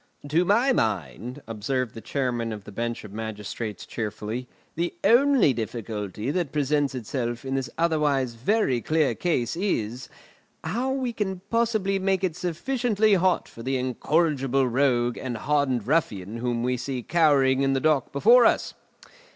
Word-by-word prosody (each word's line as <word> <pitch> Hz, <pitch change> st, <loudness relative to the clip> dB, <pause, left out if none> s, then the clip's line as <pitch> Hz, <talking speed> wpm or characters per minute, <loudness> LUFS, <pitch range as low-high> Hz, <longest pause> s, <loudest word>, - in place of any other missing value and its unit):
"To 165 Hz, +4 st, +3 dB
my 230 Hz, +8 st, +3 dB
mind," 110 Hz, -, -2 dB
observed 115 Hz, +2 st, -2 dB
the 115 Hz, -, -8 dB
Chairman 120 Hz, -1 st, -2 dB
of 105 Hz, -2 st, -6 dB
the 105 Hz, -, -11 dB
Bench 115 Hz, +3 st, -3 dB
of 105 Hz, -2 st, -10 dB
Magistrates 110 Hz, 0 st, -5 dB
cheerfully, 110 Hz, +2 st, -4 dB, 0.3 s
"the 170 Hz, +1 st, -2 dB
only 255 Hz, -, +5 dB
difficulty 110 Hz, -1 st, -4 dB
that 170 Hz, -3 st, -1 dB
presents 145 Hz, -1 st, 0 dB
itself 120 Hz, +1 st, -3 dB
in 135 Hz, -, -3 dB
this 135 Hz, -3 st, -1 dB
otherwise 150 Hz, -6 st, +1 dB
very 130 Hz, -, +1 dB
clear 155 Hz, -4 st, +1 dB
case 140 Hz, -2 st, -1 dB
is, 130 Hz, -, -2 dB, 0.5 s
how 250 Hz, +4 st, -1 dB
we 260 Hz, -3 st, -2 dB
can 190 Hz, -4 st, -3 dB
possibly 220 Hz, -4 st, +1 dB
make 190 Hz, 0 st, 0 dB
it 180 Hz, -4 st, 0 dB
sufficiently 215 Hz, +5 st, +1 dB
hot 185 Hz, -1 st, +2 dB
for 115 Hz, -, -12 dB
the 130 Hz, +2 st, -1 dB
incorrigible 135 Hz, 0 st, +1 dB
rogue 120 Hz, -1 st, +1 dB
and 125 Hz, -3 st, -4 dB
hardened 140 Hz, -5 st, 0 dB
ruffian 110 Hz, -, 0 dB
whom 120 Hz, 0 st, -1 dB
we 125 Hz, 0 st, 0 dB
see 125 Hz, 0 st, -4 dB
cowering 140 Hz, -5 st, +3 dB
in 135 Hz, 0 st, +2 dB
the 135 Hz, -, +1 dB
dock 155 Hz, -1 st, +1 dB
before 230 Hz, -, +6 dB
us. -, -, 0 dB
135 Hz, 150 wpm, -25 LUFS, 115-175 Hz, 0.5 s, before